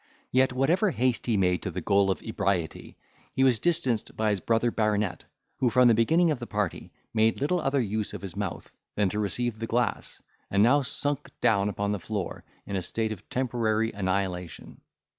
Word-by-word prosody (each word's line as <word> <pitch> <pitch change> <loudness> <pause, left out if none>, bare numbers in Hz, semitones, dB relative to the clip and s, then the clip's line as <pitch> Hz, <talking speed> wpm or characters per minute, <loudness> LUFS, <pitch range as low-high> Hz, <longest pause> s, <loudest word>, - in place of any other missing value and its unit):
Yet 130 +1 +3
whatever 165 +11 +2
haste 125 -7 0
he 115 -3 +2
made 90 -2 +2
to - - -3
the - - -4
goal 100 0 +2
of 95 - -1
ebriety, 100 -6 -2 0.4
he 130 - +3
was 125 -4 +4
distanced 130 -9 +1
by 110 -1 +2
his 100 - 0
brother 115 +4 +1
baronet, 105 -3 0 0.3
who 130 -2 +2
from 125 +1 +5
the 120 - +6
beginning 160 +10 +3
of 145 - -2
the 120 - -6
party 105 -4 -2
had - - -19 0.2
made 110 0 +2
little 170 +5 +1
other 140 -1 +1
use 110 -1 -2
of - - -8
his 95 -4 -6
mouth - - -5 0.2
than 105 -2 +2
to 105 - -3
receive 110 +2 -2
the 115 - -3
glass, 120 +1 -1 0.3
and 100 +1 +3
now 140 +6 +5
sunk 145 +1 -2
down 100 -2 +2
upon 100 0 -2
the 105 - -1
floor, 100 0 -4 0.2
in 100 - -4
a 95 - 0
state 110 +5 -2
of 105 -1 -8
temporary 115 -3 0
annihilation. 95 -3 -3
110 Hz, 200 wpm, -27 LUFS, 100-125 Hz, 0.4 s, the